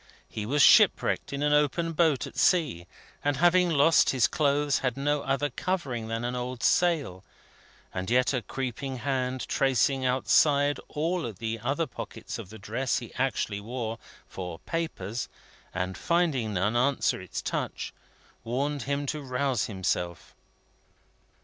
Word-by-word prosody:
He 105 -1 -5
was 145 +3 +3
ship - - +7
wrecked - - -1
in 140 +1 -2
an 150 0 +3
open 150 +3 +2
boat 155 -5 +2
at - - -10
sea, 145 - +2 0.4
and 145 -2 +1
having 175 +3 +4
lost 160 +1 +4
his 130 -3 +3
clothes, 145 -1 +1
had 125 -1 -1
no 145 +1 0
other 135 +1 -1
covering 130 -9 -2
than 115 +1 -3
an 125 +1 -2
old 125 0 -4
sail; 150 - +2 0.7
and 95 +2 -3
yet 125 +3 +3
a 125 - 0
creeping 130 +2 -4
hand, 130 -1 -2
tracing 135 +1 +2
outside 140 +3 +3
all 165 -3 -1
the 110 +3 -4
other 140 +8 -1
pockets 135 - -7
of - - -8
the 110 - -10
dress 120 +5 -1
he 120 - -7
actually 125 -6 -1
wore, 115 0 -4 0.3
for 90 -3 -6
papers, 120 - -4 0.4
and 95 0 -3
finding 150 - +1
none 100 +5 +1
answer 130 +3 +1
its - - -5
touch, - - -3 0.5
warned 140 +5 -2
him 140 0 0
to 150 +2 -3
rouse 130 -3 -1
himself. 90 -4 -3
130 Hz, 150 wpm, -28 LUFS, 115-145 Hz, 0.7 s, ship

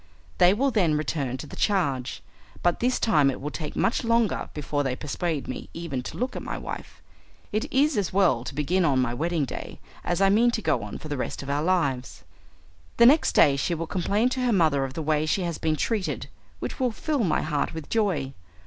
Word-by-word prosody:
They 180 0 +7
will 270 +4 +1
then 180 -9 +2
return 140 -4 -2
to 150 - -7
the - - -10
charge, 140 - 0 0.4
but 175 -1 +2
this 250 +1 +1
time 150 -11 +4
it 135 - -3
will 150 +2 -4
take 155 -1 -6
much 230 - +1
longer 230 -2 +1
before 145 -1 -1
they 135 -3 -1
persuade 150 +2 -3
me 130 - -6
even 165 -6 -3
to - - -8
look 250 +2 -2
at - - -4
my - - -4
wife. - - -8 0.5
It 215 +1 -2
is 275 -2 +3
as 195 - -2
well 185 -12 +3
to - - -6
begin 170 +6 +1
on 140 -5 +3
my 125 -2 +1
wedding 160 +3 0
day - - -7 0.2
as 175 +1 -1
I 195 0 +5
mean 230 +4 +5
to - - -5
go 120 - +1
on 105 0 -6
for - - -9
the 145 -2 -3
rest 130 - -4
of 140 - -4
our 145 +1 0
lives. 155 -8 -1 0.7
The 235 - +7
next 290 +6 +5
day 140 -2 +6
she 170 +5 -1
will 165 +1 -3
complain 200 +7 +1
to 260 - -3
her 245 - +2
mother 155 -8 +3
of 130 0 -8
the 160 - -3
way 155 0 +1
she 190 +4 +1
has 170 -2 -3
been 160 -1 +1
treated, 205 +3 -2 0.3
which - - -6
will 255 -2 +1
fill 285 +2 -1
my 165 -6 +1
heart 150 0 -1
with 160 -3 -6
joy. 180 -12 0
165 Hz, 225 wpm, -26 LUFS, 140-210 Hz, 0.7 s, They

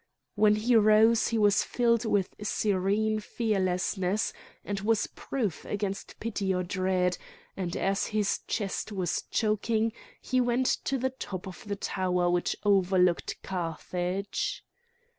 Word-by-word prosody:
When 210 0 +4
he 230 +3 +2
rose 220 +1 +5
he 230 - 0
was 205 -2 +4
filled 235 -1 +1
with 200 -4 +1
serene 210 +1 +1
fearlessness 195 -2 0 0.3
and 205 -1 -2
was 215 +1 +1
proof 220 - -3
against 200 -1 -4
pity 205 -4 -2
or 180 - 0
dread, 185 -1 0 0.4
and 175 -3 -3
as 195 +1 0
his 210 -2 0
chest 205 0 -2
was 185 -4 -1
choking 220 +1 +1 0.3
he 255 0 +1
went 245 +1 +1 0.2
to 275 - 0
the 260 +1 -1
top 195 -8 -6
of 185 +2 -10
the 200 - -2
tower 180 -3 0
which 175 0 0
overlooked 185 -3 +2
Carthage. 180 +2 -3
205 Hz, 130 wpm, -28 LUFS, 185-220 Hz, 0.4 s, rose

